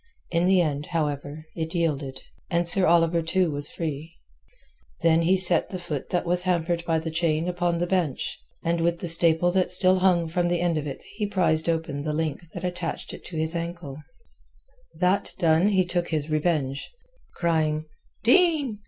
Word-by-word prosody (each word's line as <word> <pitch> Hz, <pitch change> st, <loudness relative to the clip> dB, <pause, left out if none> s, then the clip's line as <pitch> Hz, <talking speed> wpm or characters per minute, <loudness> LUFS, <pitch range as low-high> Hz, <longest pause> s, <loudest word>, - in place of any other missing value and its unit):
In 170 Hz, +1 st, +1 dB
the 190 Hz, -1 st, +4 dB
end, 145 Hz, -2 st, -3 dB
however, 150 Hz, -2 st, -3 dB
it 160 Hz, +1 st, -4 dB
yielded, 145 Hz, -6 st, -2 dB, 0.3 s
and 170 Hz, 0 st, 0 dB
Sir 185 Hz, +1 st, +3 dB
Oliver 170 Hz, 0 st, +3 dB
too 170 Hz, +1 st, 0 dB
was 145 Hz, 0 st, -1 dB
free. 160 Hz, 0 st, -6 dB, 0.9 s
Then 165 Hz, 0 st, +3 dB
he 180 Hz, +3 st, +3 dB
set 185 Hz, -1 st, +3 dB
the 185 Hz, -, -5 dB
foot 165 Hz, -6 st, -6 dB
that 175 Hz, -1 st, -1 dB
was 175 Hz, +1 st, +2 dB
hampered 175 Hz, -2 st, -1 dB
by 165 Hz, -1 st, +1 dB
the 160 Hz, 0 st, -4 dB
chain 160 Hz, 0 st, 0 dB
upon 175 Hz, -1 st, -1 dB
the 175 Hz, -, 0 dB
bench, 175 Hz, -6 st, -2 dB, 0.2 s
and 170 Hz, 0 st, 0 dB
with 170 Hz, 0 st, +1 dB
the 175 Hz, -, -6 dB
staple 165 Hz, +1 st, +5 dB
that 185 Hz, 0 st, +1 dB
still 185 Hz, +1 st, +6 dB
hung 180 Hz, -3 st, +2 dB
from 175 Hz, +2 st, -1 dB
the 175 Hz, 0 st, 0 dB
end 170 Hz, -3 st, 0 dB
of 150 Hz, -, -5 dB
it 135 Hz, -, -7 dB
he 210 Hz, -2 st, -1 dB
prised 170 Hz, -5 st, +1 dB
open 160 Hz, -3 st, -2 dB
the 150 Hz, +1 st, -3 dB
link 160 Hz, +1 st, -3 dB
that 175 Hz, -, -6 dB
attached 180 Hz, -2 st, -4 dB
it -, -, -10 dB
to 170 Hz, -, -6 dB
his 160 Hz, +1 st, -2 dB
anklet. 170 Hz, -4 st, -6 dB, 1.0 s
That 185 Hz, +2 st, 0 dB
done 165 Hz, +2 st, +3 dB
he 190 Hz, -3 st, +2 dB
took 175 Hz, -1 st, -1 dB
his 155 Hz, -1 st, -3 dB
revenge. 150 Hz, -4 st, -1 dB, 0.5 s
Crying 155 Hz, -2 st, 0 dB, 0.4 s
"Din!" 285 Hz, -, +3 dB
170 Hz, 180 wpm, -25 LUFS, 155-180 Hz, 1.0 s, still